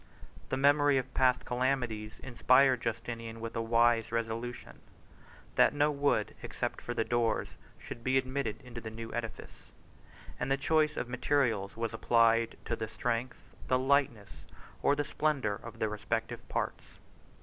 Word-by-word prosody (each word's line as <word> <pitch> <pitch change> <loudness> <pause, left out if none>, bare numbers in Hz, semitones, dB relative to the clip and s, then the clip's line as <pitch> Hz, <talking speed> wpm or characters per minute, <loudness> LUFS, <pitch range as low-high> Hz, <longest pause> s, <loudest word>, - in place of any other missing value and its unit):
The 130 - -1
memory 145 0 +4
of 130 0 -3
past 125 -1 +3
calamities 125 -4 -1
inspired 130 +1 +4
Justinian 115 +1 -4
with 115 0 -6
a 115 - 0
wise 115 0 +3
resolution, 115 +1 -4 0.8
that - - +5
no 145 +1 +3
wood, 140 -7 +1
except - - -4
for 120 - -5
the 115 - +1
doors, 120 0 0 0.3
should 115 - -9
be 130 +2 +2
admitted 130 -3 -2
into 120 -2 -8
the 110 - -6
new 115 0 -7
edifice; 115 -1 -7 0.7
and 135 - -2
the 135 - +3
choice 150 +2 +2
of - - -1
the 125 - -12
materials 125 -6 0
was 115 -1 -2
applied 115 0 +3
to 115 - -1
the 110 -1 -4
strength, 120 +2 -2 0.3
the 130 - +3
lightness, 130 -6 +1 0.4
or 140 - +3
the 145 - 0
splendor 145 -6 0
of 115 -1 -10
the 110 - 0
respective 105 0 -3
parts. - - -2
120 Hz, 155 wpm, -31 LUFS, 115-135 Hz, 0.8 s, that